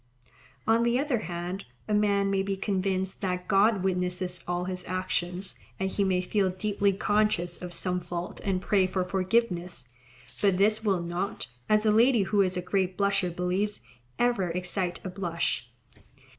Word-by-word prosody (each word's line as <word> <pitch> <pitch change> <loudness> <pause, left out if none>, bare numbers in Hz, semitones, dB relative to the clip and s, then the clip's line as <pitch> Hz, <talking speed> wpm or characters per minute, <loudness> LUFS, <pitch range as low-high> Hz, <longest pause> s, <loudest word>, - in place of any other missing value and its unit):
On 225 +1 +4
the 235 +1 +2
other 275 -3 +1
hand, 175 +1 -5 0.2
a 215 - -1
man 200 -1 +2
may 195 -1 +2
be 195 0 -2
convinced 190 -1 -1
that 180 -1 -2
God 195 0 +4
witnesses 180 -1 -1
all 175 0 -1
his 180 0 -2
actions, 185 0 -2 0.2
and 190 0 -1
he 200 - +1
may 185 -2 +2
feel 190 +1 +1
deeply 200 +2 +1
conscious 205 -3 +1
of 180 -1 -6
some 180 +1 -1
fault 175 0 -5
and 190 -2 0
pray 195 -3 +3
for 185 0 -1
forgiveness; 185 - -1 0.5
but 195 -3 +3
this 215 +3 +3
will 190 -5 +1
not, 175 +4 -3 0.2
as 215 0 +4
a 215 - +5
lady 230 0 +5
who 200 +1 +2
is 185 -1 +1
a 180 - -2
great 185 -1 0
blusher 200 -2 +2
believes, 180 +4 -1 0.4
ever 240 -7 +2
excite 180 +1 -1
a - - -4
blush. 170 -10 -2
190 Hz, 165 wpm, -28 LUFS, 180-205 Hz, 0.5 s, a